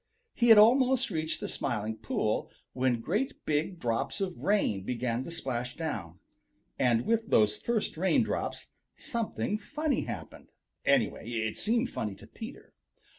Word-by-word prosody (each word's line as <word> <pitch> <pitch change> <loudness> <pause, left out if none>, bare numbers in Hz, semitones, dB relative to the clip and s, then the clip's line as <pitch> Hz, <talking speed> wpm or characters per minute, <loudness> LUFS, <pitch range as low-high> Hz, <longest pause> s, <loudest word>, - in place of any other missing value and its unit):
He 240 - +2
had 225 - +10
almost 255 +3 +5
reached 160 -1 -2
the - - -2
Smiling 110 -3 -2
Pool 110 - -1 0.2
when 125 -2 +1
great 215 - -2
big 155 +4 0
drops 115 - -1
of 190 -3 -2
rain 195 - +1
began 120 +3 -2
to - - -6
splash 125 -6 -3
down. 90 - -4 0.6
And 120 -2 +3
with 225 -1 +1
those 105 -1 +4
first 230 -8 -1
raindrops 185 +3 0 0.3
something 230 -5 -2
funny 300 +4 -1
happened. - - -8 0.3
Anyway, 115 - +2
it 110 -2 -1
seemed 235 +3 +1
funny 105 -3 -3
to 105 - -14
Peter. 225 - -10
160 Hz, 140 wpm, -30 LUFS, -, 0.6 s, had